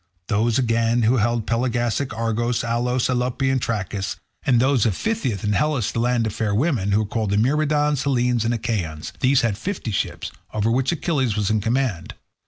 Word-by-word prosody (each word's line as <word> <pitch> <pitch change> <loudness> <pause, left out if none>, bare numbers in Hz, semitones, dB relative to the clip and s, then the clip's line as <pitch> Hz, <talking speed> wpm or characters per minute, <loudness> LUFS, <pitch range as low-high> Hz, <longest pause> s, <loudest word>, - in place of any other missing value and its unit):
Those 110 +2 +2
again 115 -1 +2
who 120 +4 +3
held 115 0 +1
Pelasgic 120 +2 0
Argos, 115 +1 -1
Alos, 120 +2 0
Alope, 125 +1 -1
and 130 -1 0
Trachis; 100 -3 -2 0.3
and 125 -3 +3
those 130 -3 +3
of 100 - 0
Phthia 130 - -2
and 105 0 +1
Hellas 145 -3 +1
the - - -2
land 120 -1 +1
of 110 - -2
fair 110 -2 -1
women, 115 - +1
who 105 +2 +3
were - - -5
called 105 -2 -1
Myrmidons, 150 +3 +2
Hellenes, 125 -4 +1
and 115 - 0
Achaeans; 95 -10 -3
these 135 0 +3
had 115 -4 -1
fifty 180 - -4
ships, 100 - -3 0.2
over 110 +1 +1
which 130 +4 +1
Achilles 140 -9 0
was 105 -1 0
in 110 -1 +1
command. 115 -5 -1
120 Hz, 185 wpm, -22 LUFS, 110-130 Hz, 0.3 s, who